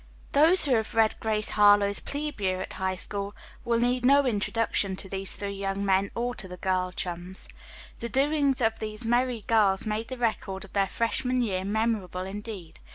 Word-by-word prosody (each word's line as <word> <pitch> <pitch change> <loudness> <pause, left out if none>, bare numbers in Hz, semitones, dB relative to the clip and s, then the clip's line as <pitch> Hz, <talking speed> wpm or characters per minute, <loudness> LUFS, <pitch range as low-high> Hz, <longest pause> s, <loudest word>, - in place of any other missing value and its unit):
Those 320 +6 +5
who 275 - +2
have 220 -2 0
read 225 -1 +4
"Grace 215 -1 -1
Harlowe's 205 -1 +5
Plebe 295 -5 -5
Year 185 -1 0
at 185 - -5
High 190 0 -2
School" 200 +2 -5 0.3
need 240 +2 +1
no 280 +2 +5
introduction 210 -3 0
to 190 - -5
these 195 0 -3
three 200 -1 -4
young 195 0 -3
men 195 0 +2
or 245 +1 -1
to 210 - -7
the 180 0 -9
girl 185 -1 0
chums. 180 +1 -6 0.5
The 235 - -4
doings 280 0 +2
of 225 -1 +1
these 215 +1 -5
merry 240 0 +1
girls 205 -4 +3
made 215 +1 -2
the 260 - -6
record 210 -5 -2
of 195 - -18
their 195 -1 +2
freshman 250 +4 0
year 190 -4 -1
memorable 205 -3 -1
indeed. 195 -3 -8
215 Hz, 180 wpm, -27 LUFS, 195-240 Hz, 0.5 s, Those